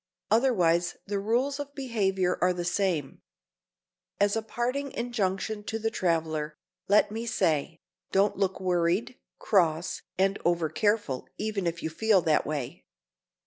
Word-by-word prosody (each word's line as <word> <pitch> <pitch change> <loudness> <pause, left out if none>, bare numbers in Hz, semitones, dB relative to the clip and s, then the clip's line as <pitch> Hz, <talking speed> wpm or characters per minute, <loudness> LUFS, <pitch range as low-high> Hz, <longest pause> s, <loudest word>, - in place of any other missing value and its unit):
Otherwise 180 -8 +3
the 200 0 -2
rules 250 +7 0
of 285 0 -6
behavior 195 -9 0
are 180 0 +4
the 175 -1 -4
same. 175 -6 -1 1.0
As 205 +1 +3
a 225 - 0
parting 250 +5 -2
injunction 215 -3 -2
to 220 - -2
the 225 0 -1
traveler, 160 -5 -1 0.3
let 205 +1 +4
me 225 +2 -4
say,—don't 170 +2 0
look 190 -1 0
worried, 180 +5 0 0.2
cross 170 -5 +1 0.2
and 195 +1 +2
over 170 -2 +1
careful 205 - 0
even 210 -4 -2
if 170 0 -3
you 160 - -2
feel 205 +1 +3
that 155 -1 +2
way. 145 -5 -4
195 Hz, 135 wpm, -28 LUFS, 170-220 Hz, 1.0 s, are